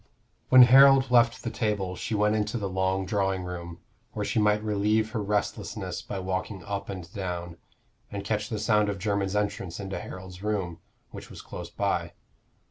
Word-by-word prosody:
When 130 Hz, -1 st, +10 dB
Harold 135 Hz, +1 st, +7 dB
left 120 Hz, -1 st, +4 dB
the 115 Hz, -, -3 dB
table 100 Hz, -5 st, -1 dB
she 110 Hz, -, -3 dB
went 105 Hz, +1 st, +2 dB
into 110 Hz, +3 st, -1 dB
the 100 Hz, -3 st, -2 dB
long 95 Hz, 0 st, 0 dB
drawing 95 Hz, -1 st, 0 dB
room, 85 Hz, -1 st, -6 dB, 0.4 s
where 105 Hz, -1 st, -3 dB
she 115 Hz, -, 0 dB
might 105 Hz, 0 st, +2 dB
relieve 110 Hz, +1 st, +1 dB
her 110 Hz, -2 st, -2 dB
restlessness 105 Hz, 0 st, -2 dB
by 100 Hz, -, -6 dB
walking 95 Hz, +1 st, -3 dB
up 100 Hz, +2 st, -4 dB
and 90 Hz, -4 st, -6 dB
down, 90 Hz, -3 st, -5 dB, 0.5 s
and 100 Hz, -1 st, -4 dB
catch 105 Hz, 0 st, -1 dB
the 110 Hz, -, -2 dB
sound 105 Hz, -1 st, +2 dB
of 100 Hz, -, -3 dB
Jermyn's 100 Hz, 0 st, -1 dB
entrance 100 Hz, -4 st, -2 dB
into 95 Hz, -1 st, -4 dB
Harold's 95 Hz, 0 st, -9 dB
room, 95 Hz, -5 st, -2 dB, 0.3 s
which -, -, -9 dB
was -, -, -10 dB
close -, -, -8 dB
by. -, -, -1 dB
100 Hz, 175 wpm, -27 LUFS, 95-105 Hz, 0.5 s, When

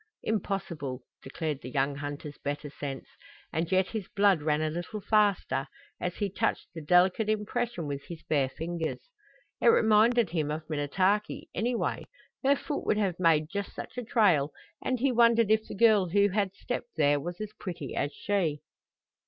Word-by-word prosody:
Impossible, 175 Hz, -, -3 dB, 0.2 s
declared 150 Hz, +1 st, -4 dB
the 125 Hz, -, -7 dB
young 140 Hz, +2 st, 0 dB
hunter's 145 Hz, 0 st, -6 dB
better 145 Hz, 0 st, -4 dB
sense. 140 Hz, -2 st, -6 dB, 0.5 s
And 165 Hz, +3 st, -1 dB
yet 185 Hz, 0 st, +3 dB
his 215 Hz, -5 st, -4 dB
blood 200 Hz, -5 st, +3 dB
ran 150 Hz, 0 st, +1 dB
a 155 Hz, -, 0 dB
little 175 Hz, +6 st, -5 dB
faster 205 Hz, -9 st, +2 dB, 0.3 s
as 180 Hz, 0 st, -3 dB
he 205 Hz, -, -1 dB
touched 195 Hz, -, -1 dB
the 165 Hz, -, -6 dB
delicate 180 Hz, +7 st, +3 dB
impression 215 Hz, -2 st, -1 dB
with 140 Hz, -1 st, -5 dB
his 170 Hz, -3 st, -8 dB
bare 140 Hz, -4 st, +1 dB
fingers. 170 Hz, -, -4 dB, 0.5 s
It -, -, +3 dB
reminded 225 Hz, -, +5 dB
him 155 Hz, -4 st, -1 dB
of 155 Hz, +1 st, -4 dB
Minnetaki, 185 Hz, +8 st, 0 dB
anyway; 240 Hz, +1 st, -1 dB, 0.4 s
her 275 Hz, +1 st, +5 dB
foot 290 Hz, +1 st, -4 dB
would -, -, +3 dB
have 190 Hz, -5 st, 0 dB
made 160 Hz, -2 st, +3 dB
just 200 Hz, 0 st, -4 dB
such -, -, -7 dB
a 250 Hz, -, -3 dB
trail, 185 Hz, -, +3 dB, 0.3 s
and 255 Hz, -1 st, 0 dB
he 270 Hz, +2 st, +2 dB
wondered 230 Hz, -2 st, +4 dB
if 220 Hz, 0 st, +3 dB
the -, -, -7 dB
girl 210 Hz, -4 st, +5 dB
who 200 Hz, +3 st, +4 dB
had 200 Hz, -1 st, -1 dB
stepped 240 Hz, +2 st, -5 dB
there 145 Hz, -2 st, +3 dB
was 175 Hz, +4 st, -6 dB
as 215 Hz, 0 st, -5 dB
pretty 175 Hz, -8 st, -5 dB
as 145 Hz, -, -1 dB
she. 165 Hz, -4 st, -1 dB
180 Hz, 170 wpm, -29 LUFS, 150-215 Hz, 0.5 s, reminded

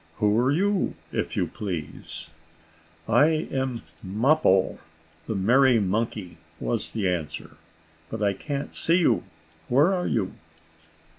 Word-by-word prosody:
Who 105 Hz, 0 st, +2 dB
are 125 Hz, +3 st, +3 dB
you, 195 Hz, +5 st, +1 dB, 0.2 s
if -, -, -2 dB
you -, -, +2 dB
please?" 85 Hz, -4 st, -5 dB, 0.8 s
"I 155 Hz, +8 st, +3 dB
am 130 Hz, -3 st, -2 dB, 0.2 s
Mappo, 105 Hz, 0 st, +2 dB, 0.5 s
the 110 Hz, -, -2 dB
merry 120 Hz, +5 st, +4 dB
monkey," 105 Hz, -1 st, -2 dB, 0.2 s
was -, -, 0 dB
the 105 Hz, -4 st, -1 dB
answer. 80 Hz, -4 st, -3 dB, 0.5 s
"But 110 Hz, -1 st, -3 dB
I 100 Hz, -1 st, +3 dB
can't 140 Hz, +6 st, -5 dB
see 170 Hz, +2 st, +3 dB
you. 175 Hz, -, +3 dB, 0.4 s
Where 145 Hz, +10 st, +4 dB
are 180 Hz, -1 st, -1 dB
you?" 100 Hz, -5 st, -1 dB
115 Hz, 125 wpm, -26 LUFS, 95-145 Hz, 0.8 s, merry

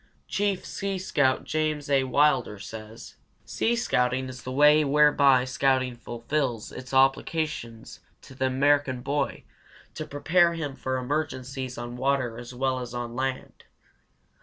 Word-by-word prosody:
Chief 200 Hz, -2 st, -1 dB
Sea 195 Hz, -1 st, -3 dB
Scout 145 Hz, -8 st, +1 dB
James 155 Hz, -1 st, -1 dB
A. 135 Hz, -2 st, +2 dB
Wilder 130 Hz, -5 st, +2 dB
says: 110 Hz, +3 st, -10 dB, 0.3 s
Sea 235 Hz, -, 0 dB
scouting 130 Hz, -, 0 dB
is 130 Hz, 0 st, -9 dB
the 130 Hz, -, -6 dB
way 150 Hz, +3 st, +5 dB
whereby 140 Hz, -3 st, +4 dB
scouting 130 Hz, -1 st, +1 dB
fulfills 120 Hz, 0 st, -3 dB
its 130 Hz, 0 st, -9 dB
obligation 135 Hz, -3 st, 0 dB, 0.4 s
to -, -, -13 dB
the 130 Hz, 0 st, 0 dB
American 135 Hz, -1 st, +2 dB
boy 140 Hz, +2 st, -2 dB, 0.5 s
to 155 Hz, -, -6 dB
prepare 170 Hz, +4 st, +2 dB
him 150 Hz, -5 st, -4 dB
for 130 Hz, -1 st, -2 dB
emergencies 130 Hz, -1 st, -3 dB
on 120 Hz, +1 st, -6 dB
water 130 Hz, -3 st, 0 dB
as 120 Hz, 0 st, -9 dB
well 130 Hz, +1 st, -1 dB
as 125 Hz, -1 st, -7 dB
on 120 Hz, -1 st, -5 dB
land. 130 Hz, 0 st, -4 dB
130 Hz, 135 wpm, -26 LUFS, 125-150 Hz, 0.5 s, way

